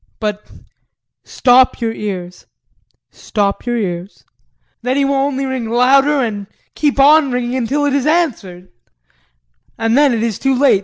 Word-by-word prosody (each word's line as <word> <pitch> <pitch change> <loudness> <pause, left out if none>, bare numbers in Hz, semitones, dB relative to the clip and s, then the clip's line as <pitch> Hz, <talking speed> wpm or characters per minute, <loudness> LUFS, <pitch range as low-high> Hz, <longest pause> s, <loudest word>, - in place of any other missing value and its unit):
But 210 -1 -4 0.7
stop 255 0 +3
your 230 -2 -2
ears, 185 -5 -7 0.6
stop 205 +2 -3
your 240 0 0
ears. 180 -2 -5 0.6
Then 255 +3 -1
he 280 - +2
will 280 - 0
only 275 0 -1
ring 260 -4 -4
louder 270 +4 +3
and 205 -5 -4 0.3
keep 290 -2 -1
on 290 0 +5
ringing 245 0 -2
until 265 +4 -1
it's 280 0 0
answered 220 - -1 1.1
and 225 +1 0
then 285 0 +4
it 230 -2 -1
is 230 -4 -2
too 270 -1 0
late! 270 -7 +4
250 Hz, 145 wpm, -16 LUFS, 215-275 Hz, 1.1 s, on